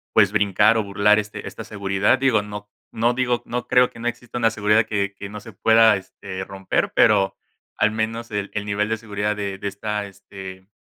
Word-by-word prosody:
pues, 100 Hz, -, +5 dB
brincar 105 Hz, +2 st, +3 dB
o 110 Hz, -, +1 dB
burlar, 100 Hz, +1 st, +3 dB
este 105 Hz, 0 st, -6 dB
esta -, -, -8 dB
seguridad. 100 Hz, +3 st, +1 dB
Digo, 130 Hz, -5 st, +2 dB
no 105 Hz, 0 st, -8 dB, 0.2 s
no, 115 Hz, +2 st, +1 dB
digo, 125 Hz, -1 st, 0 dB
no 125 Hz, 0 st, -4 dB
creo 125 Hz, 0 st, +4 dB
que -, -, -14 dB
no 120 Hz, -, -3 dB
exista 120 Hz, 0 st, -5 dB
una 115 Hz, -2 st, +3 dB
seguridad 105 Hz, 0 st, +2 dB
que 100 Hz, -2 st, -2 dB
que 100 Hz, 0 st, -8 dB
no 105 Hz, +1 st, -7 dB
se 110 Hz, +1 st, -12 dB
pueda, 110 Hz, +2 st, +5 dB
este, 95 Hz, 0 st, -8 dB
romper, 95 Hz, -1 st, -2 dB
pero 100 Hz, -2 st, +4 dB, 0.4 s
al 110 Hz, -, +3 dB
menos 115 Hz, +1 st, -3 dB
el 105 Hz, -1 st, -3 dB
el 105 Hz, -1 st, -3 dB
nivel 105 Hz, +1 st, -1 dB
de 110 Hz, -, 0 dB
seguridad 105 Hz, -1 st, -2 dB
de 100 Hz, -2 st, -4 dB
de 100 Hz, -, -5 dB
esta, 105 Hz, +1 st, -3 dB
este, 95 Hz, -1 st, -11 dB
105 Hz, 205 wpm, -22 LUFS, 100-110 Hz, 0.4 s, pues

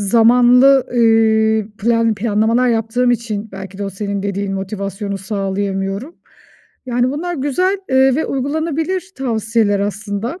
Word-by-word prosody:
zamanlı, 245 Hz, +5 st, +5 dB
ııı, 220 Hz, -2 st, +3 dB
plan 230 Hz, 0 st, +1 dB
planlamalar 225 Hz, +3 st, +1 dB
yaptığım 230 Hz, +2 st, +1 dB
için 220 Hz, -3 st, -2 dB
belki 195 Hz, 0 st, -9 dB
de 200 Hz, -, -3 dB
o 195 Hz, -, -4 dB
senin 200 Hz, +1 st, -4 dB
dediğin 200 Hz, 0 st, -3 dB
motivasyonu 195 Hz, 0 st, -4 dB
sağlayamıyorum. 195 Hz, -, -3 dB, 0.7 s
Yani, 245 Hz, +1 st, 0 dB
bunlar 345 Hz, +5 st, -3 dB
güzel, 320 Hz, +8 st, 0 dB
eee, 265 Hz, 0 st, +4 dB
ve 315 Hz, -, -1 dB
uygulanabilir 320 Hz, +7 st, -2 dB
tavsiyeler 220 Hz, -5 st, 0 dB
aslında. 210 Hz, -, -4 dB
225 Hz, 120 wpm, -17 LUFS, 200-255 Hz, 0.7 s, zamanlı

